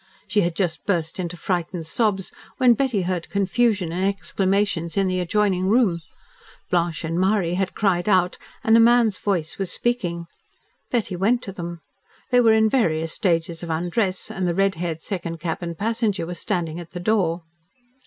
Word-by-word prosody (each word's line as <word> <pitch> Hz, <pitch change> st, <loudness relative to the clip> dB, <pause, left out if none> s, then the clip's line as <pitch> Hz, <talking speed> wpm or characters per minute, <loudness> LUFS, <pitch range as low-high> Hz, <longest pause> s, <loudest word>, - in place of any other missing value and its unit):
She 210 Hz, -, +2 dB
had 170 Hz, -2 st, 0 dB
just 175 Hz, -4 st, -1 dB
burst 170 Hz, -3 st, -1 dB
into 175 Hz, -1 st, -4 dB
frightened 175 Hz, -1 st, -2 dB
sobs, 195 Hz, +2 st, 0 dB, 0.3 s
when 255 Hz, -3 st, +6 dB
Betty 240 Hz, -6 st, 0 dB
heard 180 Hz, -2 st, -3 dB
confusion 200 Hz, -2 st, +1 dB
and 180 Hz, +3 st, -2 dB
exclamations 195 Hz, -3 st, 0 dB
in 195 Hz, -, +3 dB
the 185 Hz, -1 st, 0 dB
adjoining 185 Hz, 0 st, +1 dB
room. 200 Hz, -6 st, +3 dB, 0.7 s
Blanche 170 Hz, -3 st, 0 dB
and 165 Hz, +2 st, -1 dB
Marie 190 Hz, -2 st, +2 dB
had 190 Hz, +1 st, -1 dB
cried 190 Hz, -2 st, +1 dB
out, 180 Hz, -2 st, +2 dB, 0.2 s
and 225 Hz, -, +5 dB
a -, -, +7 dB
man's 230 Hz, -3 st, +4 dB
voice 175 Hz, -5 st, -2 dB
was 195 Hz, -2 st, -2 dB
speaking. 175 Hz, -9 st, -1 dB, 0.6 s
Betty 225 Hz, -6 st, -1 dB
went 220 Hz, +7 st, +1 dB
to 195 Hz, -, -6 dB
them. 170 Hz, -3 st, -7 dB, 0.5 s
They 245 Hz, 0 st, +6 dB
were 225 Hz, -2 st, +5 dB
in 220 Hz, 0 st, +4 dB
various 165 Hz, -10 st, +1 dB
stages 165 Hz, -2 st, 0 dB
of 170 Hz, -, -6 dB
undress, 180 Hz, +4 st, -1 dB
and 185 Hz, -2 st, -2 dB
the 170 Hz, -, 0 dB
red 195 Hz, 0 st, +2 dB
haired 165 Hz, -1 st, -4 dB
second 170 Hz, -4 st, -4 dB
cabin 170 Hz, +1 st, -3 dB
passenger 215 Hz, -1 st, -1 dB
was 175 Hz, +1 st, -6 dB
standing 170 Hz, -4 st, -2 dB
at 170 Hz, 0 st, -10 dB
the 180 Hz, -, -5 dB
door. 175 Hz, -4 st, +1 dB
185 Hz, 175 wpm, -23 LUFS, 170-210 Hz, 0.7 s, a